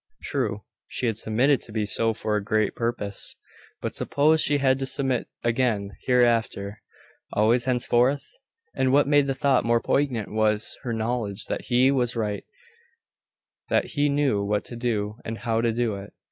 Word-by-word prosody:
True, - - -2 0.2
she - - -3
had 115 -2 0
submitted 125 +6 +2
to - - -9
be 110 -1 -1
so 115 +2 +1
for 105 0 -1
a 105 - -1
great 110 0 +1
purpose. 115 -4 -2 0.5
But - - -3
suppose 155 +2 +2
she 145 - +3
had 135 -1 +2
to 135 - -2
submit 135 -4 0 0.2
again 115 -4 0 0.2
hereafter 115 -4 +1 0.5
always 115 +3 +3
henceforth? 125 +2 +2 0.5
And 130 -1 +1
what 140 +1 +4
made 145 -1 +4
the 135 - -1
thought 135 -1 +2
more 115 0 +3
poignant 125 -5 0
was, 110 0 +2
her 125 - -4
knowledge 110 -2 -2
that - - -4
he 125 +2 +4
was 125 -3 0
right; 105 -3 -2 1.2
that - - +1
he 145 -1 +2
knew 140 -8 +1
what 105 +1 -1
to 120 - -8
do, 110 -3 -2
and 110 0 -5
how 115 -1 -1
to 115 0 +1
do 115 -1 0
it. 100 0 -10
120 Hz, 170 wpm, -25 LUFS, 110-130 Hz, 1.2 s, what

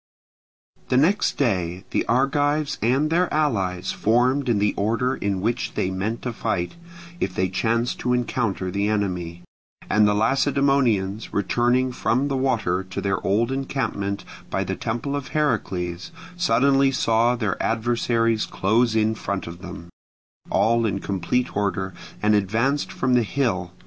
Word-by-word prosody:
The 125 - +3
next 180 +10 +2
day 95 -8 0
the - - +1
Argives 145 +4 +1
and 135 +7 +2
their 175 +2 +2
allies 100 -13 0
formed 125 +4 +2
in 115 - +3
the 105 +1 +1
order 115 +5 0
in 100 -2 -2
which 115 +3 -2
they 95 - 0
meant 100 +5 -3
to 125 - -3
fight, 100 -6 -2 0.5
if 90 - -2
they 95 0 +1
chanced 115 +5 0
to 125 - -1
encounter 115 -6 -1
the 100 +2 0
enemy; 90 -5 -2 0.5
and 105 0 +5
the 105 - +2
Lacedaemonians 120 -4 +1
returning 120 +5 +1
from 130 +3 0
the 135 - -1
water 115 -9 0
to 95 +1 -6
their 100 -1 -1
old 115 +5 +1
encampment 115 -7 -2 0.2
by - - -1
the - - -3
temple 120 +5 -3
of 140 -2 -4
Heracles, 100 - -1 0.2
suddenly 140 -4 +3
saw 120 -1 +2
their 110 -6 -2
adversaries 115 -1 +1
close 110 +4 +1
in 110 0 +2
front 100 -4 -4
of 85 +1 -9
them, 90 -2 -9 0.6
all 115 +1 +2
in 100 - -1
complete 100 +7 -1
order, 95 -2 -1 0.3
and 105 0 +4
advanced 115 +8 +1
from 130 0 0
the 125 - +5
hill. 105 -7 -1
115 Hz, 150 wpm, -23 LUFS, 100-130 Hz, 0.6 s, and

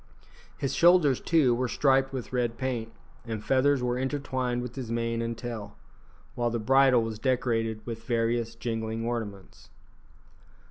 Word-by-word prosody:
His 135 -1 -2
shoulders, 170 -6 +5
too, 155 -8 +3
were 125 +1 0
striped 135 +1 +2
with 130 -2 -6
red 120 -2 0
paint, 120 -4 -3 0.3
and 110 -3 -5
feathers 135 +2 +3
were 125 0 0
intertwined 130 -2 -2
with 125 -1 -6
his 130 -4 -5
mane 115 0 -1
and 115 0 -3
tail, 110 -4 -6 0.6
while 120 -1 0
the 120 - -2
bridle 130 +1 +4
was 110 -1 -5
decorated 115 -4 0
with 115 -1 -6
various 115 -1 0
jingling 115 -1 -3
ornaments. 105 -5 -5
120 Hz, 145 wpm, -28 LUFS, 115-130 Hz, 0.6 s, shoulders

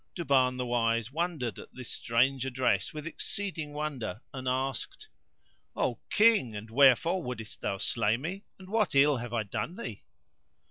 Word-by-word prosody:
Duban 130 -7 +2
the 125 - -2
Wise 115 -1 +1
wondered 155 -7 -2
at - - -11
this 130 -2 -8
strange 125 +3 +1
address 130 -1 +1
with 150 -1 -7
exceeding 165 -2 -3
wonder 140 -9 -4
and 130 -1 -5
asked, 135 - -2 0.7
"O - - 0
King, 210 - +4
and 110 +2 -7
wherefore 140 +8 +5
wouldest 120 -6 -6
thou 100 - -1
slay 110 +2 +1
me, 180 - -5
and 185 - -13
what 215 -5 +1
ill 140 0 +5
have 120 0 -6
I 115 -2 0
done 110 - -4
thee?" 110 - -6
130 Hz, 155 wpm, -30 LUFS, 115-160 Hz, 0.7 s, wherefore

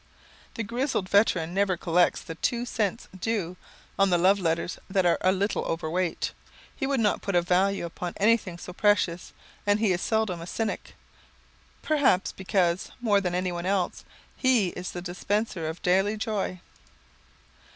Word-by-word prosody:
The 230 - -2
grizzled 235 -2 -1
veteran 185 -5 +2
never 195 -2 +1
collects 175 +1 +2
the 165 - -7
"two 240 +8 -1
cents 225 -2 -2
due" 190 -4 -2 0.4
on 195 0 +5
the 175 - +4
love 190 +4 +4
letters 170 0 -1
that 190 -1 +2
are 175 - +3
a 185 - +4
little 200 +2 0
overweight. 165 +2 -1 0.4
He 270 - -2
would 275 -2 +1
not 210 -2 +2
put 200 - -2
a 175 - +5
value 185 +1 +2
upon 170 +1 -5
anything 205 -4 +2
so 180 +1 -9
precious, 190 -4 +1 0.3
and 205 0 +2
he 215 -3 +2
is 175 - -2
seldom 220 -6 0
a 170 - -7
cynic 220 +2 -3 0.9
perhaps 280 -12 +2
because, 185 -2 0
more 210 -5 +3
than 180 -2 -1
anyone 180 -1 -2
else, 190 -2 0 0.3
he 245 -8 +3
is 180 +1 -6
the 175 - -6
dispenser 185 -1 -2
of 160 - -8
daily 195 +4 +2
joy. 205 -4 -2
190 Hz, 160 wpm, -27 LUFS, 175-210 Hz, 0.9 s, on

